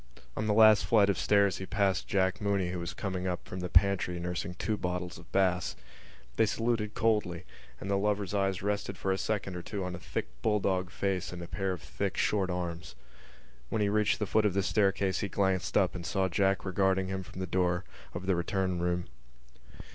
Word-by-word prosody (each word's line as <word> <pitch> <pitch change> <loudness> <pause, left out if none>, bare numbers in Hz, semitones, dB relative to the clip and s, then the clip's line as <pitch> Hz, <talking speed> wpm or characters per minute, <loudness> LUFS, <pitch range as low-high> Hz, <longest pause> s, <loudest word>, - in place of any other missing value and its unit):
On 110 - -2
the 105 - +3
last 110 -1 +7
flight 100 -3 +5
of 95 - -3
stairs 100 -2 +3
he 95 - -6
passed 100 -2 +1
Jack 95 -1 +1
Mooney 100 -3 0
who 90 - -3
was 85 0 -5
coming 95 -2 -3
up 90 -1 -3
from 95 - -6
the 90 0 -3
pantry 90 -1 +3
nursing 90 0 -3
two 110 +3 -1
bottles 90 -2 -3
of - - -16
Bass. 90 -2 +1 0.6
They 110 - +4
saluted 115 -1 -1
coldly; 95 -5 +1 0.3
and - - -6
the 100 0 +1
lover's 105 -1 0
eyes 95 -2 0
rested 105 0 -2
for 95 - -1
a 95 - +1
second 100 -4 -2
or 90 - -4
two 100 +2 -4
on 90 0 -4
a 85 - -6
thick - - -4
bulldog 95 - +1
face 95 -1 -2
and 90 -1 -6
a - - -7
pair 95 0 -2
of 90 -5 -5
thick - - -3
short 100 -3 +1
arms. 90 -3 -4 0.7
When 110 -2 0
he 100 - +2
reached 105 0 +2
the 105 - -1
foot 110 +3 +2
of 95 - -2
the 100 - +2
staircase 95 -2 +1
he 100 - -2
glanced 95 -2 +1
up - - +3
and 90 - -6
saw 95 +5 0
Jack 95 +2 +1
regarding 95 0 +1
him 95 0 -2
from 95 - -10
the 95 - -1
door 90 0 0 0.3
of 90 +1 -4
the 95 -1 +2
return 90 +1 -1
room. 90 0 0
95 Hz, 210 wpm, -30 LUFS, 90-100 Hz, 0.7 s, last